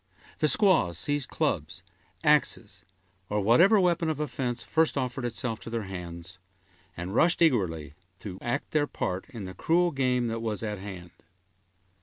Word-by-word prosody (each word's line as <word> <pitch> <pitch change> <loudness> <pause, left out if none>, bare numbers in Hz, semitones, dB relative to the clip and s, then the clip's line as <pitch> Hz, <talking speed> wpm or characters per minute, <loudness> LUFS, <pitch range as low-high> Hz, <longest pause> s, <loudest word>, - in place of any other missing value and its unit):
The 155 - +3
squaws 150 - +4
seized 145 +7 -1
clubs, - - -2 0.4
axes, - - +1 0.4
or 105 - 0
whatever 170 - +5
weapon 170 -3 +2
of 155 -2 -2
offense 125 -4 -2
first 160 -2 +1
offered 130 -1 -2
itself 115 -1 -3
to - - -9
their 115 -1 -2
hands, 90 -1 -8 0.6
and 90 +3 -5
rushed 170 +9 +3
eagerly 90 - +1 0.3
to 95 -3 -7
act 130 +4 -3
their 150 -1 +2
part 95 0 -4
in 115 -8 -7
the 95 - -7
cruel 175 - +2
game 125 -3 +1
that 115 0 -2
was 110 -1 -3
at 105 -2 -3
hand. 95 -3 -8
120 Hz, 155 wpm, -28 LUFS, 95-150 Hz, 0.6 s, whatever